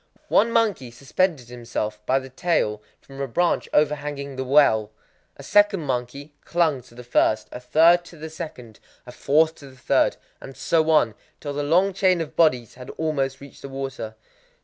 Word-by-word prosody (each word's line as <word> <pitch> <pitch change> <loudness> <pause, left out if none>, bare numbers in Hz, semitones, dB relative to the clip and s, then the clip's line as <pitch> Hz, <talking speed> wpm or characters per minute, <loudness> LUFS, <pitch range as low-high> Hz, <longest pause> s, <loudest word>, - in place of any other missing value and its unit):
One 230 +3 +3
monkey 210 - +1
suspended 135 +2 -1
himself 110 -3 -5
by 130 - +3
the 130 0 -5
tail 130 - 0 0.2
from 135 0 -10
a 140 - -2
branch 175 +8 0
overhanging 145 -2 -1
the 130 - -3
well, 130 -6 +3 0.5
a - - -11
second 205 -3 +3
monkey 140 +2 -4
clung 160 -6 +1
to 120 -1 -20
the 125 - -10
first, 110 -2 +1
a - - -7
third 165 +7 +4
to 170 - -14
the 160 +1 -8
second, 125 -9 -9 0.3
a 125 - -10
fourth 155 +6 +2
to 140 - -11
the 130 - -18
third, 130 - +1 0.2
and 135 -2 -11
so 160 +2 +1
on,—till 145 0 0
the 145 - -2
long 180 +7 +2
chain 185 -2 +2
of 165 -3 -5
bodies 130 -8 +2
had 125 0 -11
almost 140 -4 -2
reached 140 - -13
the 140 - -8
water. 135 -5 -6
140 Hz, 175 wpm, -23 LUFS, 125-160 Hz, 0.5 s, third